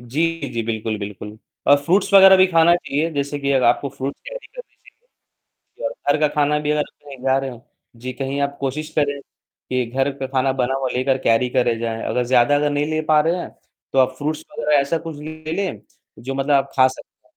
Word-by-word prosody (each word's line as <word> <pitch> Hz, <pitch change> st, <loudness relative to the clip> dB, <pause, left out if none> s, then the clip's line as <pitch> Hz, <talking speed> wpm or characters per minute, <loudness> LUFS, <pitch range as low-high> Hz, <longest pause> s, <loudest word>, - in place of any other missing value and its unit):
जी, 120 Hz, +6 st, -4 dB, 0.3 s
जी, 115 Hz, -1 st, -2 dB
बिल्कुल, 110 Hz, -1 st, -2 dB
बिल्कुल। 105 Hz, +1 st, -8 dB, 0.3 s
और 145 Hz, -, +7 dB
फ्रूट्स 190 Hz, +6 st, +1 dB
वगैरह 190 Hz, 0 st, +9 dB
भी 185 Hz, 0 st, +6 dB
खाना 170 Hz, -1 st, +4 dB
चाहिए, 160 Hz, 0 st, -2 dB
जैसे 145 Hz, 0 st, -2 dB
कि 140 Hz, 0 st, -2 dB
अगर 130 Hz, -2 st, +2 dB
आपको 130 Hz, +4 st, +2 dB
फ्रूट्स 135 Hz, +2 st, -6 dB
कैरी -, -, -8 dB
कर -, -, -10 dB, 1.0 s
लीजिए -, -, -11 dB
और -, -, -5 dB, 0.2 s
घर -, -, 0 dB
का 150 Hz, -, +4 dB
खाना 150 Hz, 0 st, +2 dB
भी 150 Hz, 0 st, -1 dB
अगर 150 Hz, 0 st, +1 dB
कहीं 140 Hz, -2 st, -14 dB
जा 135 Hz, 0 st, +3 dB
रहे 135 Hz, 0 st, -3 dB
हो 125 Hz, +2 st, -12 dB, 0.3 s
जी, 125 Hz, +2 st, -6 dB
कहीं 135 Hz, +2 st, -3 dB
आप 140 Hz, 0 st, -2 dB
कोशिश 145 Hz, +3 st, -3 dB
करें 145 Hz, -1 st, +1 dB, 0.5 s
कि 130 Hz, -1 st, 0 dB
घर 135 Hz, +2 st, +1 dB
का 135 Hz, -1 st, -4 dB
खाना 130 Hz, 0 st, +1 dB
बना 130 Hz, 0 st, 0 dB
हुआ 135 Hz, -1 st, -1 dB
लेकर 130 Hz, +1 st, +1 dB
कैरी 125 Hz, 0 st, +2 dB
करे 120 Hz, -2 st, +1 dB
जाएँ, 115 Hz, -1 st, -3 dB
अगर 125 Hz, -, 0 dB
ज़्यादा 125 Hz, +3 st, +3 dB
अगर 145 Hz, 0 st, +2 dB
नहीं 145 Hz, 0 st, 0 dB
ले 155 Hz, 0 st, 0 dB
पा 155 Hz, 0 st, +3 dB
रहे 165 Hz, +3 st, +1 dB
हैं, -, -, -5 dB, 0.4 s
तो 135 Hz, -, +3 dB
आप 130 Hz, 0 st, +2 dB
फ्रूट्स 155 Hz, +2 st, -3 dB
वगैरह 150 Hz, -1 st, +1 dB
ऐसा 140 Hz, +4 st, 0 dB
कुछ 160 Hz, -2 st, -8 dB
ले 155 Hz, +1 st, -8 dB
लें, 195 Hz, -1 st, -3 dB, 0.4 s
जो 130 Hz, +4 st, -5 dB
मतलब 135 Hz, +2 st, -1 dB
आप 135 Hz, -, +1 dB
खा 130 Hz, -1 st, +6 dB
सकते 130 Hz, -, -11 dB
140 Hz, 220 wpm, -21 LUFS, 130-155 Hz, 1.0 s, वगैरह